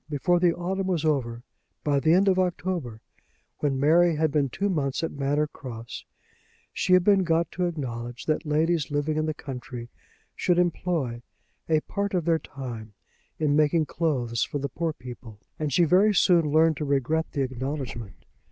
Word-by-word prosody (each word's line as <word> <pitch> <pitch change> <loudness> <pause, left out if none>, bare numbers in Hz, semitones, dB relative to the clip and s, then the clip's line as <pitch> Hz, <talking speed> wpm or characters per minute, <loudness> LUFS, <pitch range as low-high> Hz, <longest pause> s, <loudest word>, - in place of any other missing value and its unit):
Before 175 +4 +1
the 175 -1 +3
autumn 190 +2 -2
was 170 -4 0
over, 120 -6 -1 0.4
by 145 -2 +2
the 155 +3 +2
end 190 +3 +4
of 185 -1 +3
October, 170 -9 -2 0.6
when 140 -3 0
Mary 165 +4 +4
had 155 0 +1
been 140 -2 +1
two 195 +11 -1
months 150 -6 -1
at 165 - -1
Manor 145 +2 0
Cross, 120 -6 -9 0.7
she 185 - +1
had 185 -1 +6
been 195 -1 +4
got 165 -1 +1
to 180 0 -1
acknowledge 120 -7 -5
that 155 0 0
ladies 155 +1 +1
living 145 +1 -1
in 155 0 0
the 155 - -2
country 125 -4 -7 0.5
should 175 - +1
employ 170 -8 0 0.5
a 155 -1 +3
part 200 +2 -3
of 175 -3 0
their 165 -1 +2
time 115 -8 -8 0.4
in 150 -2 +1
making 155 +1 +3
clothes 130 -9 -1
for - - -3
the 140 0 -3
poor 165 +4 -2
people; 120 -5 -11 0.2
and 150 -2 -1
she 170 - +4
very 190 +6 +4
soon 170 -5 +4
learned 160 0 +4
to - - -3
regret 145 +4 0
the 140 - 0
acknowledgment. 125 - -5
150 Hz, 175 wpm, -26 LUFS, 130-170 Hz, 0.7 s, had